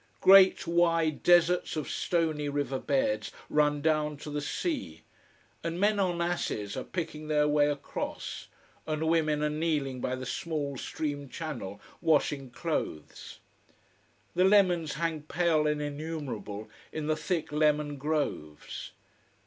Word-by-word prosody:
Great 190 0 +7
wide 165 -2 +2
deserts 175 0 +4
of 155 -2 -3
stony 160 -4 0
river 140 -2 -1
beds 270 0 0 0.2
run 150 -1 +2
down 155 -2 +1
to 150 - -8
the 145 0 -2
sea, 310 - -3 0.6
and 165 +1 -3
men 205 +1 +3
on 180 -3 +1
asses 110 -12 -2
are 130 - -3
picking 155 -3 -5
their 150 -1 +3
way 150 0 +3
across, 145 -1 -5 0.4
and 155 0 -1
women 155 -2 +2
are 150 - +2
kneeling 150 -5 -1
by 130 - -1
the 130 0 -6
small 145 0 -3
stream 145 +1 -4
channel 125 - -6 0.2
washing 145 -4 +2
clothes. 120 - -4 0.9
The 180 - +3
lemons 185 -5 +4
hang 165 -1 -1
pale 155 0 +1
and 150 0 0
innumerable 145 -8 -5 0.2
in 155 -1 -4
the 155 0 +1
thick 165 0 -2
lemon 150 -1 +2
groves. 140 - -3
155 Hz, 135 wpm, -29 LUFS, 145-170 Hz, 0.9 s, Great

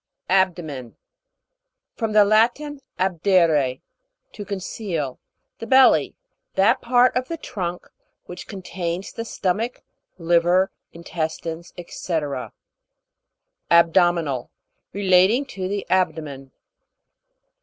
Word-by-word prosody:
ABDO'MEN. 170 -10 0 1.0
From 225 -2 -2
the 210 -1 +6
Latin, 240 +8 +2 0.2
abdere, 170 -7 +2 0.5
to 210 - -8
conceal. 185 - -4 0.4
The 230 - -7
belly; 265 +2 +5 0.4
that 220 +7 +3
part 245 +1 +3
of 250 0 -1
the 335 - -4
trunk 180 - -5 0.4
which 180 0 -9
contains 185 -2 -5
the 230 - -5
stomach, 220 +2 -2 0.3
liver, 175 +2 +2 0.2
intestines, 165 0 -5 0.2
&c, 180 - -6 1.6
ABDO'MINAL. 170 -5 +3 0.4
Relating 195 +6 +3
to 190 -8 -5
the 200 +1 -3
abdo 180 -4 +1
men. 135 -2 -10
185 Hz, 90 wpm, -22 LUFS, 170-210 Hz, 1.6 s, the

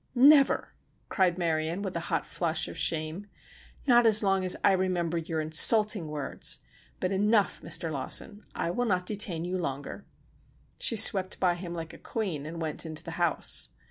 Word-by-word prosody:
"Never!" 275 +2 +4 0.4
cried 185 -3 +1
Marion, 165 +2 -2
with 190 -3 -5
a - - -1
hot - - -1
flush 165 -2 -2
of - - -9
shame. 160 +5 -2 0.6
"Not 240 -3 +5
as 215 -1 +6
long 195 -1 +1
as 185 - +3
I - - +5
remember 180 -3 -1
your 165 -1 -4
insulting 185 +4 +3
words. 150 -2 -3 0.4
But 185 - -2
enough, 205 +1 +1
Mr. 165 -3 -2
Lawson, 155 +9 -1
I 170 - -2
will 245 +7 -2
not 180 -3 0
detain 185 -5 -2
you 185 +1 -3
longer." 140 -4 -5 0.8
She 230 - +4
swept 195 -3 +4
by 180 -2 +2
him 175 0 -7
like 165 -1 -7
a - - -13
queen 175 -10 -4
and 165 +1 -7
went 155 -2 -2
into 155 -1 -6
the - - -7
house. - - +2
180 Hz, 175 wpm, -28 LUFS, 160-205 Hz, 0.8 s, as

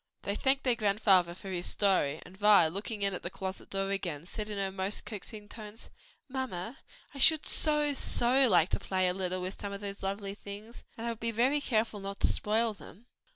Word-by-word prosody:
They 200 - -1
thanked 270 +4 +2
their 250 - +3
grandfather 200 -5 +3
for 195 - -9
his 175 -1 -2
story, 180 -7 +2
and 180 - -13
Vi 205 -3 +6
looking 200 +4 -4
in 195 -1 +2
at 180 - -4
the 175 - -4
closet 190 0 -6
door 195 0 -1
again, 170 -6 -3
said 210 +3 -4
in 210 - -4
her 195 -1 -1
most 190 +2 -3
coaxing 210 0 -7
tones, 215 0 -10 0.4
"Mamma, 255 -5 -4 0.3
I 275 - -8
should 315 +3 +5
so, 300 -2 +1
so 260 0 +3
like 175 -3 +5
to - - 0
play 185 -1 +1
a 180 - +2
little 185 -1 -2
with 185 +1 -5
some 200 -1 -4
of 200 - -6
those 200 -1 -5
lovely 195 +1 -3
things; 205 +3 -10
and 230 - -5
I 235 - 0
would 225 - -7
be 230 - -1
very 250 +6 +2
careful 220 -4 0
not 195 0 -6
to - - +5
spoil 220 +2 +1
them." 200 +4 -14
205 Hz, 215 wpm, -31 LUFS, 190-230 Hz, 0.4 s, Vi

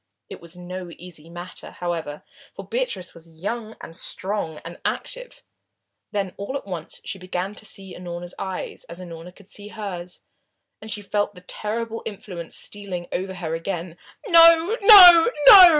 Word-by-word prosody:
It - - -9
was 170 +1 -12
no 180 0 -7
easy 165 -3 -12
matter, 175 +1 -8
however, 165 -4 -4 0.3
for - - -9
Beatrice - - -3
was 165 0 -15
young 215 +7 -5
and 165 - -10
strong 185 -3 -2
and 170 +1 -9
active. - - -4 0.7
Then 195 -3 -2
all 200 +8 -4
at - - -10
once 175 -5 -7
she 195 - -4
began 185 +2 -4
to 215 0 -7
see 195 -1 -7
Unorna's 175 0 -7
eyes, 190 -1 -5
as 170 +1 -10
Unorna 170 -1 -9
could 200 - -18
see 205 0 -6
hers, 185 -5 -7 0.6
and 220 - -9
she 210 -1 -4
felt 205 0 -1
the 180 - -10
terrible 225 +4 -4
influence 190 -5 -7
stealing 190 -4 -4
over 190 +1 -3
her 165 -3 -4
again. 170 0 -4 0.3
"No 335 +2 +7
no 370 -3 +10 0.2
no!" 370 -4 +12
185 Hz, 160 wpm, -23 LUFS, 175-215 Hz, 0.7 s, no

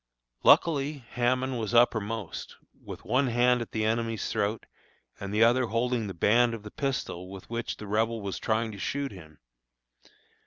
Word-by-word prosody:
Luckily 150 -3 +4 0.2
Hammond 125 +1 0
was 110 +1 -2
uppermost, 110 -4 +1 0.3
with - - -9
one 130 +4 +2
hand 125 +1 +3
at 115 - -6
the 110 -1 -1
enemy's 115 0 -1
throat 105 +2 -1 0.5
and 100 0 -5
the 105 +2 +4
other 120 +2 +4
holding 115 0 0
the 95 - -6
band 115 +6 +3
of 110 - -10
the 105 - -9
pistol 125 -10 -3
with 95 +3 -11
which 115 0 -3
the 105 - -8
Rebel 110 +2 0
was 100 -2 -4
trying 110 0 0
to 100 - -9
shoot 140 +6 -2
him. 80 -5 -13
115 Hz, 165 wpm, -28 LUFS, 105-125 Hz, 0.5 s, Luckily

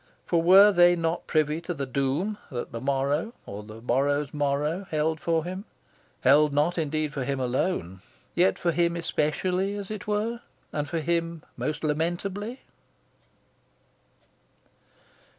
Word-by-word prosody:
For 170 -2 +2
were 195 +5 +8
they 175 -2 +6
not 165 0 -2
privy 155 0 +1
to 175 +1 -4
the 140 -2 -3
doom 140 +10 -1
that 125 -3 -5
the 115 - -5
morrow, 140 - 0
or 100 +1 -7
the 110 +2 -11
morrow's 140 +3 +1
morrow, 150 +6 -1
held 155 +1 0
for 165 -1 0
him 185 +3 -5 0.6
held 145 +3 +5
not 150 +5 +1
indeed 155 -1 -1
for 140 - -2
him 135 +1 -2
alone, 120 - -1 0.3
yet 180 +2 +3
for 170 - +1
him 170 0 +1
especially, 180 +4 0
as 205 0 -6
it 210 -1 -6
were, 220 +3 -1 0.3
and 150 -1 -2
for 165 -2 -1
him 170 0 -1
most 155 +1 -3
lamentably? 180 - -2
160 Hz, 140 wpm, -27 LUFS, 145-180 Hz, 0.6 s, were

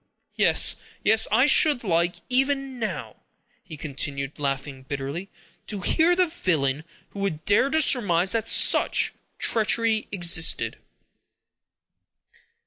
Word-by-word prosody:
Yes, - - +2 0.3
yes, 220 +1 +3
I 255 - +3
should 295 -3 +2
like, 175 -2 0
even 270 0 -1
now," 185 - -6 0.5
he 155 - -11
continued, 140 -1 -4
laughing 135 -1 -4
bitterly, 140 +7 -6 0.4
"to 205 -3 -5
hear 330 - +2
the 365 0 +3
villain 160 - -2 0.2
who 200 - -11
would 160 -6 -4
dare 210 +7 +2
to 315 +1 +3
surmise 190 -9 +3
that 225 -1 0
such - - +3 0.2
treachery 225 0 +1
existed!" 175 -4 +2
195 Hz, 115 wpm, -23 LUFS, 150-245 Hz, 0.5 s, yes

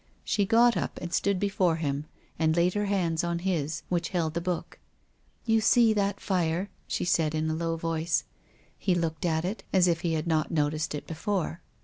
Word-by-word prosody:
She 200 -2 +1
got 235 +2 +5
up - - -2
and 175 0 -6
stood 200 -2 +1
before 190 -4 +2
him 145 -2 -2 0.3
and 160 0 +2
laid 175 +1 +3
her 205 0 0
hands 175 -5 0
on 170 0 -1
his, 170 -4 -2
which 175 -2 -1
held 165 -4 -1
the 170 - -2
book. 175 -1 -4 0.3
" - - -39
You 225 -1 +3
see 225 0 +5
that 200 -1 0
fire? 180 0 -1
" - - -37
she - - -1
said 160 -3 +2
in 155 0 0
a - - -1
low 165 0 -1
voice. 165 0 0 0.6
He 185 - +1
looked 165 -1 -2
at 160 0 0
it, 200 +5 -4
as 185 -2 +4
if 170 -2 +1
he 170 -2 0
had 155 0 -1
not. 160 -2 +1
noticed 155 -1 0
it 150 - -6
be - - -6
fore. 175 0 -2
170 Hz, 215 wpm, -28 LUFS, 160-190 Hz, 0.6 s, got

